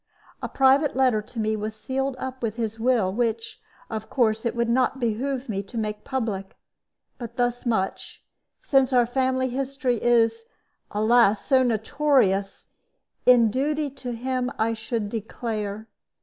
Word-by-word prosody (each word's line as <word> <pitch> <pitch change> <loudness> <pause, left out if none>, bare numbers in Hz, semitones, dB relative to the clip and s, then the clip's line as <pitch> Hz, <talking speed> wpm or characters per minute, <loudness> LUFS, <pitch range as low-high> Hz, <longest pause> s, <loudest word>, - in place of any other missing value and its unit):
A - - -4
private 270 +2 +3
letter 255 -5 +3
to 230 +2 -9
me 215 0 0
was 215 0 -4
sealed 265 +4 -2
up 260 0 -6
with 225 -2 -2
his 225 -1 -3
will, 225 -6 +2
which, 230 0 -2 0.3
of 220 -1 -6
course, 225 -2 +1
it 230 - -3
would 235 0 0
not 255 +3 +1
behoove 255 +3 -2
me 200 -4 -2
to 200 +4 -10
make 210 -1 -3
public. 220 -8 -3 0.6
But 235 0 -8
thus 245 0 -1
much 195 -5 -2 0.4
since 270 -2 +3
our 245 -1 +5
family 260 +1 0
history 260 -2 -2
is, 230 -1 +2 0.4
alas! 215 0 +3
so 265 -2 +4
notorious 220 -4 +1 0.6
in 235 -3 +6
duty 290 +3 -1
to 255 -2 -6
him 250 +1 -2
I 230 +1 +1
should 225 -1 -3
declare. 215 -1 -4
235 Hz, 150 wpm, -25 LUFS, 220-260 Hz, 0.6 s, in